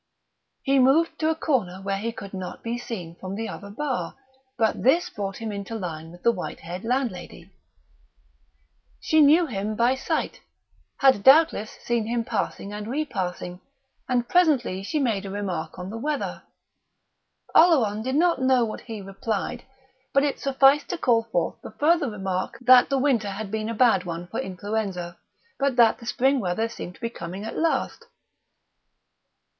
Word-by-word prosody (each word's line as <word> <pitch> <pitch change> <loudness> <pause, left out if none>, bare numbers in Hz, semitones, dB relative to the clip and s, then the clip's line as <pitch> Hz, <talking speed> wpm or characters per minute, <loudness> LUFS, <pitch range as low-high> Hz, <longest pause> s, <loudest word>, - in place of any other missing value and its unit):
He 275 0 +3
moved 275 +6 +3
to 315 - +1
a 320 - +1
corner 235 - -1
where 195 0 -2
he 230 +3 -2
could 200 -3 -9
not 185 -1 -6
be 230 +1 -2
seen 180 -9 -6
from 190 +1 -6
the 225 +2 -3
other 200 - -8
bar; 265 +5 -3 0.4
but 220 -1 +1
this 330 +8 +3
brought 195 -1 -4
him 225 -2 -4
into 200 +2 -5
line 165 -6 -5
with 175 +1 -15
the 235 - +5
white 180 - -6
haired 175 +3 -7
landlady. 235 -7 -3 1.5
She 315 0 +3
knew 310 +4 +6
him 215 -5 -3
by 235 +3 +3
sight 265 - -2 0.6
had 265 -7 +5
doubtless 270 -4 +5
seen 235 -2 0
him 235 0 0
passing 205 -2 -3
and 210 0 -6
repassing; 190 -10 -3 0.5
and 245 -1 +1
presently 280 - +2
she 255 +11 -3
made 230 -8 0
a 195 - -6
remark 190 -4 -4
on 180 +2 -6
the 225 - -5
weather. 295 +3 -3 1.1
Oleron 245 - +5
did 260 +4 -2
not 335 -3 +3
know 260 -2 +4
what 215 - -6
he 220 -4 -7
replied, 200 +5 -4 0.5
but 275 - +5
it 285 -2 -1
sufficed 275 +1 +4
to 355 - -2
call 230 -6 +2
forth 175 -4 -1
the - - -10
further 310 -2 +3
remark 190 -3 -3
that 250 0 +7
the 275 - +1
winter 255 -7 +1
had 200 +1 -6
been 220 0 -2
a 230 - -3
bad 220 -5 +4
one 170 0 -5
for - - -5
influenza, 190 -2 -4 0.4
but 275 -2 +1
that 235 -2 +5
the 235 - -11
spring 265 +3 +2
weather 200 +2 -1
seemed 180 -5 -8
to - - -21
be 230 -1 -3
coming 185 0 -7
at 225 - -6
last.... 330 +7 -1
225 Hz, 170 wpm, -25 LUFS, 195-265 Hz, 1.5 s, that